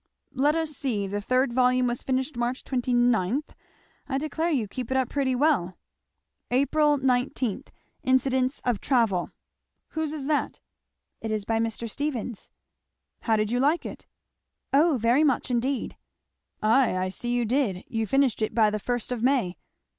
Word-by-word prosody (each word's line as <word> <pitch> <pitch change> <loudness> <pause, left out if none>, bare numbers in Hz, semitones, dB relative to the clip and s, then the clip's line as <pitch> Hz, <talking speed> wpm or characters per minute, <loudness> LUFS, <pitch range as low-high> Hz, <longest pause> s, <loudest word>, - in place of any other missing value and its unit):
"Let 290 +4 +2
us 320 -2 -1
see 245 -8 -2
the 205 +1 -3
third 255 +3 +1
volume 255 0 +3
was 240 -1 -1
finished 260 +2 -1
March 240 +2 -2
29 245 -1 +1 0.7
I 270 - 0
declare 310 +3 -1
you 255 -10 0
keep 250 +3 -6
it 265 - +1
up 260 -2 +1
pretty 270 -3 0
well." 250 - +1 0.7
'Ap. 260 +3 +1
19. 265 -5 +1 0.4
Incidents 260 0 +1
of 245 -5 0
Travel' 225 -9 +1 0.6
"Whose 315 -2 -2
is 300 -3 -5
that?" 295 0 -1 0.6
"It 225 - -4
is 215 -2 -2
by 225 +1 0
Mr. 230 0 -2
Stephens." 245 -3 -4 0.7
"How 225 - +1
did 215 0 0
you 245 - +1
like 295 +6 +2
it?" - - -8 0.7
"O 300 +1 +4
very 240 +6 +3
much 265 -3 +1
indeed." 250 +2 -1 0.7
"Ay, 225 -1 +3
I 185 0 -1
see 240 +5 -4
you 245 -1 +1
did; 225 -6 0
you 225 -3 -2
finished 270 -1 +2
it 215 - -1
by 215 -2 +4
the 215 - -2
first 245 +2 -3
of 245 -3 -2
May. 245 -8 +1
250 Hz, 160 wpm, -26 LUFS, 225-275 Hz, 0.7 s, O